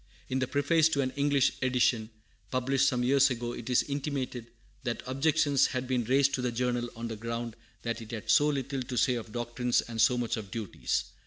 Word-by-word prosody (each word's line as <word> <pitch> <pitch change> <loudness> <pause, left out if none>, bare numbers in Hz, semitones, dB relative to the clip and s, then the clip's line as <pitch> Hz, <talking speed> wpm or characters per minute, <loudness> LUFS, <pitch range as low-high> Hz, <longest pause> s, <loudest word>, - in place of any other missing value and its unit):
In 130 - 0
the 130 - 0
preface 155 +4 +3
to 140 -3 +1
an 130 -1 -1
English 140 0 +2
edition, 125 -3 +2 0.4
published 135 +3 +2
some 125 -1 +1
years 140 +2 +4
ago, 120 -1 -3
it 120 0 -7
is 125 - +4
intimated 140 -4 -3 0.4
that 120 -2 -3
objections 140 +1 +2
had 130 0 -3
been 125 -2 0
raised 135 +3 +3
to 130 - 0
the 125 -1 -1
Journal 120 0 -1
on 115 +1 -5
the 115 - -5
ground 115 +1 -4 0.3
that 115 0 -3
it 110 - -10
had 110 -2 -6
so 150 - +5
little 135 -2 -2
to 125 0 -5
say 125 - +3
of 115 -2 -5
doctrines 120 +1 0
and 115 -1 -3
so 125 - +4
much 120 -2 -1
of 105 -3 -7
duties. 105 -1 -2
125 Hz, 210 wpm, -29 LUFS, 120-135 Hz, 0.4 s, so